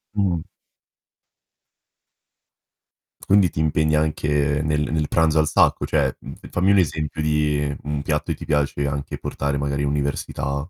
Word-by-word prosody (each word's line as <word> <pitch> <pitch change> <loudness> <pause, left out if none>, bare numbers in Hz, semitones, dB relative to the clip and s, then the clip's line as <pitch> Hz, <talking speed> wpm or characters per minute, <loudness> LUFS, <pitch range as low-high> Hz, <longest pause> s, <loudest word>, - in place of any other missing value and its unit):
Mh-mh. 90 -5 0 2.8
Quindi 100 -3 +4
ti - - -7
impegna 75 0 +2
anche 75 -1 0
nel 75 -1 0
nel 75 -1 0
pranzo 80 -1 +2
al 75 - +2
sacco, 75 - +3
cioè - - +1 0.4
fammi 95 +3 +2
un 100 - +5
esempio 80 -3 0
di 75 -1 0
un 75 -1 -3
piatto 75 -1 -1
che - - -1
ti - - -8
piace 70 -1 0
anche 70 0 -4
portare 70 0 -2
magari 70 0 -1
università. 70 +1 -2
75 Hz, 135 wpm, -22 LUFS, 70-80 Hz, 2.8 s, un